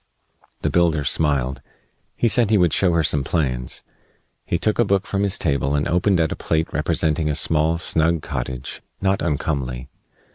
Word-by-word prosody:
The - - 0
builder 85 -4 +2
smiled. 70 -3 0 0.5
He 120 - +1
said 115 -1 +3
he 110 - +4
would 90 -6 +3
show 90 +3 +2
her 85 -1 +2
some 75 -2 +1
plans. 65 -5 -2 0.6
He 85 - 0
took 105 +6 -1
a - - +6
book 100 -3 0
from 100 - -2
his 100 -1 +3
table 70 -2 0
and 70 - 0
opened 90 +2 +2
at 80 -2 +1
a - - -2
plate 80 0 -2
representing 80 -1 0
a 75 - 0
small, 80 +1 +2
snug 80 -1 +1
cottage, 65 -2 -5 0.2
not 95 0 0
uncomely. 70 -5 -2
80 Hz, 175 wpm, -21 LUFS, 70-90 Hz, 0.6 s, a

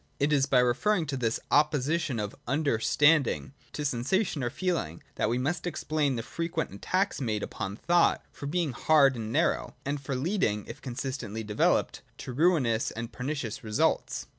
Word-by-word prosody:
It 145 +2 +2
is 140 -1 +3
by 135 - +3
referring 160 +10 +2
to 140 -2 -3
this 115 -4 0
opposition 150 -2 +2
of 105 -1 -3
Understanding 145 +1 +2 0.2
to 150 - -3
sensation 145 - 0
or 120 - 0
feeling 155 - -2
that - - 0
we 120 - +1
must 160 +7 -1
explain 155 -5 0
the 115 - -3
frequent 165 - -3
attacks 185 - -1
made 110 -4 -1
upon 100 -2 -4
thought 175 +8 +2
for 140 - -7
being 165 -1 0
hard 140 +2 +4
and 110 -2 -5
narrow, - - 0
and 140 0 -2
for 135 -1 -3
leading, 130 - 0
if - - -9
consistently 120 -4 -4
developed, 105 -1 +1 0.2
to 125 - -7
ruinous 130 -7 +2
and 115 +1 -6
pernicious 125 -4 -4
results. 110 -1 0
135 Hz, 165 wpm, -28 LUFS, 115-155 Hz, 0.2 s, hard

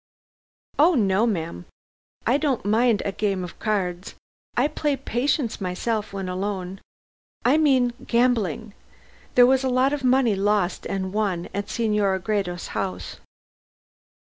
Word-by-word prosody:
"Oh, 330 +4 +6
no, 205 -1 +2
ma'am. 165 - -3 0.6
I 250 +4 +3
don't 285 -7 -1
mind 220 +1 +2
a 200 - 0
game 195 -2 -1
of 175 - -9
cards. 185 -4 -2 0.4
I - - +4
play 295 -1 -1
'Patience' 255 -2 -1
myself 210 +4 -2
when 195 -1 -4
alone. 190 0 -4 0.6
I 265 +5 +5
mean 260 -5 +3
gambling 230 -4 +1 0.6
there 245 - +8
was 265 +1 +3
a 260 - +1
lot 255 +2 +2
of 290 -2 -3
money 255 -3 +3
lost 200 -1 0
and 190 -1 -3
won 200 -5 -1
at 200 +1 -3
Senora 210 -4 +1
Gredos' 185 -3 -2
house!" 185 - -4
210 Hz, 135 wpm, -24 LUFS, 190-250 Hz, 0.6 s, there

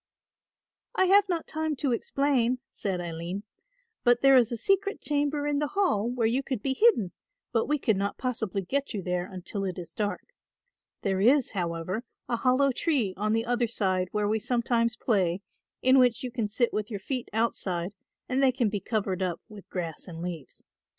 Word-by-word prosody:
"I 375 - +4
have 395 +1 +5
not 340 -3 -1
time 315 -1 -2
to 275 -1 -1
explain," 255 0 +1
said 190 -3 -3
Aline, 175 +3 -4 0.6
"but 240 +1 +4
there 270 0 +7
is 245 -3 +5
a 235 - -2
secret 395 - +1
chamber 290 0 0
in 290 -1 +1
the 295 - 0
Hall 235 - +2
where 245 -2 0
you 240 +4 +2
could 260 -5 -4
be 270 - +1
hidden, 265 - +4 0.4
but 225 -2 +1
we 300 - +2
could 220 -7 +1
not 200 +1 -2
possibly 220 -6 -1
get 275 +5 -2
you 195 - -3
there 180 +1 -2
until 190 +2 -4
it 185 -2 -3
is 170 -2 -6
dark. 210 - -3 0.7
There 190 -1 +1
is, 255 +4 +4
however, 180 +2 -2 0.2
a 235 - 0
hollow 260 +3 +3
tree 255 - 0
on 215 +2 0
the 225 +1 +1
other 240 0 +1
side 185 -5 0
where 210 -1 0
we 220 +1 +1
sometimes 235 0 +1
play, 190 -4 +1 0.4
in 260 +1 +6
which 250 +1 +3
you 250 - -3
can 235 -4 -1
sit 235 +3 0
with 210 0 -2
your 205 -4 -4
feet 250 +5 -4
outside 195 -5 -1 0.3
and 255 +2 +1
they 265 -1 +5
can 240 -3 +1
be 205 0 -2
covered 195 -2 -2
up 180 -2 -1
with 210 -3 -12
grass 170 -2 -5
and 165 -1 -7
leaves. 170 -4 -7
230 Hz, 190 wpm, -28 LUFS, 195-265 Hz, 0.7 s, there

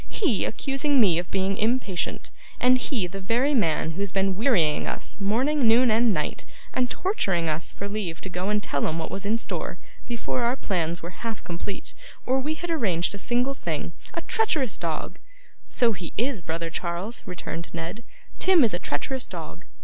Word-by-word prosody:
He 290 - +1
accusing 275 +3 +1
me 180 -7 +5
of 175 - -5
being 195 0 0
impatient, 215 -5 0 0.3
and 255 +1 +5
he 245 -8 0
the 195 +2 -6
very 240 +9 +2
man 165 - +2
who 165 - -7
has 200 -1 -1
been 195 0 +1
wearying 190 - +3
us - - -4
morning, 245 +7 +2
noon, 235 +1 +6
and 225 +1 +4
night, 155 -6 -1 0.3
and 250 -1 +1
torturing 195 - +1
us 155 0 -1
for 200 - -5
leave 200 -5 -3
to - - -5
go 180 +2 -2
and 210 -1 +1
tell 140 - 0
'em 160 - -1
what 160 - -3
was 195 +1 -3
in 220 +2 +3
store, - - -3 0.3
before 240 +1 -1
our 240 +2 +2
plans 170 -8 -1
were 170 - -5
half 225 -3 -4
complete, 175 +3 -5 0.3
or 260 +1 +3
we 300 +4 -1
had 345 +2 -4
arranged 190 - +1
a 200 - -6
single 245 +6 +1
thing. - - -3 0.2
A - - -1
treacherous 310 - +1
dog!' 165 -3 -3 0.5
'So 240 -3 +3
he 180 -5 -6
is, 240 -3 +1
brother 165 0 -3
Charles,' 175 +7 -3
returned 170 -2 -5
Ned; 170 +7 -5 0.4
'Tim 370 -5 +6
is 225 - +3
a 175 - 0
treacherous 255 - -2
dog. - - -8
205 Hz, 190 wpm, -26 LUFS, 175-250 Hz, 0.5 s, noon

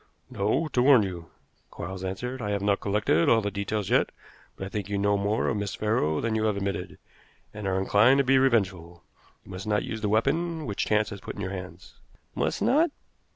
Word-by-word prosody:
"No; 105 +11 0
to 125 - +1
warn 130 -4 +6
you," 85 -4 -6 0.4
Quarles 95 +2 -7
answered. 125 +8 -4
"I 105 - -3
have 100 -1 -1
not 100 -1 +2
collected 100 -5 +1
all 115 - +5
the 105 -2 -2
details 100 0 -3
yet, - - +3 0.5
but 95 - -6
I - - -6
think 105 -1 -4
you 100 - -1
know 100 +1 +2
more 100 +2 0
of - - 0
Miss 100 -1 -3
Farrow 105 -8 0
than 115 -1 -1
you 110 0 0
have 105 -2 +1
admitted, 100 0 -4 0.6
and 105 -2 -5
are 95 0 0
inclined 105 +7 +4
to 140 - +4
be 135 0 +4
revengeful. 95 -9 0 0.4
You - - -12
must 95 +2 -7
not 105 -1 +1
use 110 -1 -5
the 105 - 0
weapon 155 +9 0
which 100 -5 -2
chance 105 +1 +1
has 100 -2 -8
put - - -7
into 105 - -5
your 100 - -4
hands." 90 -1 -10 0.3
"Must - - -1
not?" 315 +5 +4
105 Hz, 215 wpm, -27 LUFS, 95-115 Hz, 0.6 s, warn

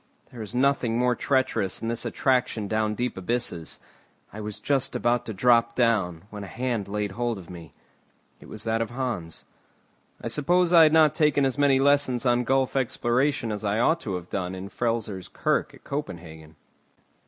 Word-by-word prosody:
There 120 - -9
is 110 +2 -7
nothing 125 -3 +2
more 125 0 +2
treacherous 130 -8 0
than 115 - -4
this 115 0 -2
attraction 125 -5 0
down 110 0 0
deep 125 -2 -2
abysses. 95 -4 -3 0.5
I 110 - -7
was 105 -1 -6
just 140 -2 -1
about 120 0 0
to - - -3
drop 115 +2 +3
down, 100 -9 +1
when 105 -1 -7
a - - -7
hand 120 -2 -3
laid 105 0 -2
hold 120 +2 -2
of 90 -2 -11
me. 85 -4 -11 0.6
It - - -14
was 110 -1 -8
that 115 0 0
of 115 - -2
Hans. 120 -10 -5 0.7
I - - -5
suppose 175 +4 +2
I 170 - +9
had 155 -1 +6
not 155 -2 +5
taken 150 -3 +3
as 130 0 -1
many 140 -2 +4
lessons 140 -3 +2
on 120 0 +2
gulf 135 +1 +1
exploration 125 -1 0
as 105 0 -4
I 105 0 0
ought 160 +8 +3
to 100 - -4
have 90 -1 -7
done 95 -1 -3
in 95 +1 -6
the 100 - -10
Frelsers 110 -6 -2
Kirk - - -1
at - - -19
Copenhagen. 80 - -7
115 Hz, 190 wpm, -26 LUFS, 100-130 Hz, 0.7 s, I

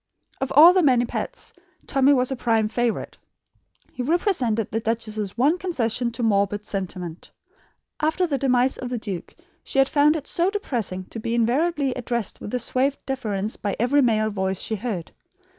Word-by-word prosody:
Of 270 - -2
all 325 +5 +10
the 370 - +4
many 250 -6 +4
pets, - - -4 0.3
Tommy 270 +1 +3
was 255 -1 +2
prime 225 -3 +1
favourite. 240 0 -2 0.7
He - - -5
represented 255 - 0
the 225 - 0
duchess's 220 -3 -3
one 295 +9 +3
concession 245 -9 -1
to 235 - -3
morbid 205 -1 +1
sentiment. 180 -4 -5 0.7
After 315 +4 +1
the 285 -5 -1
demise 255 -1 +2
of 250 - -4
the 245 - -2
duke 200 -6 -6 0.3
she - - -4
had 270 0 +5
found 295 +2 +4
it 300 -3 -4
so 350 +2 +1
depressing 235 - -3
to 225 - -6
be 230 +1 -2
invariably 275 +4 +1
addressed 235 -3 -3
with 250 +4 -3
suave 265 +4 0
deference 215 -6 -2
by 200 -2 -2
every 265 +5 +3
male 215 -3 +2
voice 190 -1 -1
she 220 - -2
heard. 200 -6 -4
240 Hz, 165 wpm, -23 LUFS, 215-275 Hz, 0.7 s, all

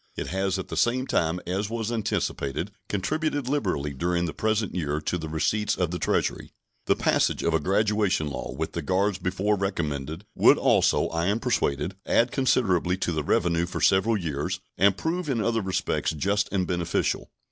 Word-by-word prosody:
It - - -4
has 95 +1 0
at 95 - -6
the - - -4
same 130 +2 +2
time, 85 -7 0
as 95 +4 -2
was 115 0 -3
anticipated, 95 - -2 0.2
contributed 145 - -1
liberally 95 - -1
during 85 +5 0
the 80 - -4
present 110 -1 0
year 75 -4 -1
to 75 - -1
the 80 -1 -5
receipts 105 +7 0
of 90 -3 0
the 90 - -3
Treasury. - - 0 0.4
The - - +4
passage - - +1
of 85 - +1
a 80 - +3
graduation 100 -1 +1
law, 70 -4 -5
with 80 +6 -3
the 85 - -3
guards 95 +5 +1
before 95 +3 0
recommended, 80 -4 -3
would - - +6
also, - - +3
I 85 +1 -1
am 105 +3 +1
persuaded, 100 - -1
add 120 +1 +3
considerably 95 -9 +2
to 95 -2 -1
the 80 -2 -1
revenue 85 +2 +1
for - - -4
several 105 +4 +3
years, 75 -6 -3 0.2
and 100 0 +3
prove 170 0 -2
in 125 -4 0
other 115 +1 +1
respects 95 -2 -1
just 100 +7 0
and 95 -2 +1
beneficial. 85 -2 -1
95 Hz, 180 wpm, -26 LUFS, 85-105 Hz, 0.4 s, would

